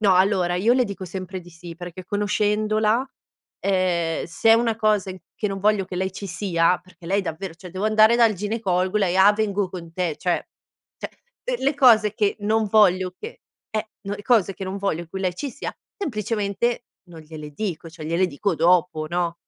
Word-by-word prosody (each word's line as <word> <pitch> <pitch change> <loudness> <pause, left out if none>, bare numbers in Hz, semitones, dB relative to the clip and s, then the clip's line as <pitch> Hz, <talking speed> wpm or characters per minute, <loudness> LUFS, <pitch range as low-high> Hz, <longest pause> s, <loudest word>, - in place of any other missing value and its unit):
No, 200 -3 +4
allora, 185 -2 +3
io 200 +7 +3
le 255 -1 +3
dico 200 -3 -6
sempre 185 +1 -6
di 175 0 -15
sì, 170 0 -10
perché 175 +1 -9
conoscendola, 210 +3 +1 0.6
ehm, 180 -4 0
se 200 +6 +1
è - - +9
una 230 -1 +1
cosa 210 -3 +1
in 185 - -8 0.2
che 210 - -2
non 195 0 -4
voglio 210 -1 +2
che 185 -1 -7
lei 190 +1 -1
ci 200 +1 -7
sia, 180 -1 +1
perché 185 -1 -20
lei 200 +3 +1
davvero, 170 0 -5
cioè, 180 +1 -11
devo 185 +3 -4
andare 215 +1 +5
dal 230 -2 +5
ginecologo, 195 -2 -1
lei: 185 -3 +1
"Ah, 195 +2 +7
vengo 205 -2 -1
con 170 -3 -9
te." 170 -4 -2
Cioè, 180 -2 -1 0.5
cioè, - - -6 0.5
l - - -11
le 280 +2 +2
cose 220 -6 +5
che 205 -2 +1
non 215 +1 +1
voglio 185 -3 +3
che 460 +3 -9 0.3
eh, 215 0 -3
no 200 0 -4
le 205 - -9
cose 215 -4 +3
in 195 - -9
cui 195 - -5
non 190 +1 -4
voglio 175 -4 -2
che 190 - -6
lei 185 -2 -1
ci 275 +10 -4
sia, 280 - -6 0.2
semplicemente 230 - -2 0.2
non 165 -2 -11
gliele 155 -1 -9
dico, 175 -1 -4
cioè 160 -1 -10
gliele 170 +3 +2
dico 180 +4 -1
dopo, 165 -1 +2
no? 170 0 -1
195 Hz, 205 wpm, -23 LUFS, 175-215 Hz, 0.6 s, è